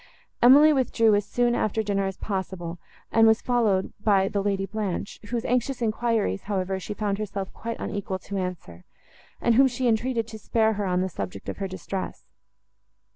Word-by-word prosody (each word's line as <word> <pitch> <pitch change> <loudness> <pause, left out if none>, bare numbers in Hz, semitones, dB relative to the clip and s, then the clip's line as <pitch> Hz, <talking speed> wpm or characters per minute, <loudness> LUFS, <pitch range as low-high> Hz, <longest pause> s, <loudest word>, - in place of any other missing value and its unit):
Emily 290 +5 +8
withdrew 230 -5 +3
as 205 0 +2
soon 240 -1 +1
after 220 -1 0
dinner 195 -1 0
as 195 - -5
possible, 185 -4 -4 0.3
and 225 0 +5
was 220 +1 +5
followed 220 -6 +1
by 195 -3 +4
the 200 0 -1
Lady 195 -1 0
Blanche, 200 -1 -4
whose 235 -1 -2
anxious 250 +1 0
enquiries, 225 - 0
however, 190 -1 -1
she 205 +2 -6
found 205 -1 -1
herself 200 -2 -4
quite 230 0 -5
unequal 195 -2 -3
to 200 +2 -8
answer, 175 - -5 0.6
and 235 - +2
whom 265 +4 +6
she 250 0 -1
entreated 230 0 +1
to 220 0 -8
spare 220 +1 +2
her 205 -1 -2
on 180 0 +1
the 190 - 0
subject 100 - -6
of - - -5
her 195 - -3
distress. 190 0 -5
205 Hz, 180 wpm, -25 LUFS, 190-230 Hz, 0.6 s, Emily